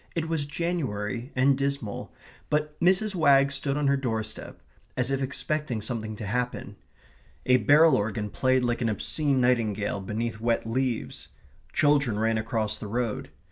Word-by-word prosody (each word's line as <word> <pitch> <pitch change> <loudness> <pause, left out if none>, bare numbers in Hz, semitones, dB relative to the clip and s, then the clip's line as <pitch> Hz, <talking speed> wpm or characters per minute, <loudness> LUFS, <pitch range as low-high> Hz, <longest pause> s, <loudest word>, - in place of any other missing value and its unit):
It 165 -1 -1
was 160 -3 -1
January 135 -8 -3
and 135 +2 +4
dismal, 140 -6 -3 0.4
but 150 0 0
Mrs. 190 +4 +3
Wagg 140 -5 +4
stood 140 0 -1
on 150 - 0
her 140 0 +4
doorstep, 110 -4 -4 0.4
as 130 +1 0
if 135 0 0
expecting 140 -1 -2
something 110 0 -4
to 105 - -6
happen. 125 +4 -3 0.7
A 125 0 +5
barrel 150 +7 +5
organ 105 0 -2
played 130 -1 +2
like 120 0 0
an 115 - +1
obscene 140 +6 +1
nightingale 110 -5 +1
beneath 110 +3 -3
wet 115 0 0
leaves. 125 0 -2 0.4
Children 140 -7 +2
ran 110 +1 +1
across 110 -1 -2
the 105 - -6
road. 115 +1 -2
125 Hz, 150 wpm, -27 LUFS, 110-140 Hz, 0.7 s, A